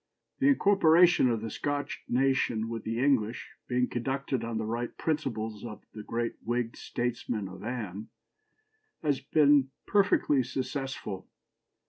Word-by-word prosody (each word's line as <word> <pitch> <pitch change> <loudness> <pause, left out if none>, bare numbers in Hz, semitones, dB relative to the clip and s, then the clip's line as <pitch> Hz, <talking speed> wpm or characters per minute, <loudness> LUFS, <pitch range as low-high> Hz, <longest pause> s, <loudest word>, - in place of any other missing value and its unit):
"The 275 - +3
incorporation 180 - +5
of 115 -2 0
the 110 -1 -5
Scotch 145 +3 -3
nation 120 -3 +1
with 115 -1 -4
the 115 +1 -3
English, 125 -4 +1 0.2
being 125 0 +1
conducted 130 0 -2
on 115 -1 -3
the 110 - -2
right 115 +2 -3
principles 115 -9 -2
by 110 -4 -6 0.2
the 110 - -7
great 115 +2 -3
Whig 120 0 -1
statesman 120 -4 -3
of 95 +1 -10
Anne, 110 -4 -5 0.9
has 145 -3 +1
been 145 -3 +4 0.2
perfectly 195 -8 +3
successful. 130 -7 -4
125 Hz, 130 wpm, -29 LUFS, 115-140 Hz, 0.9 s, incorporation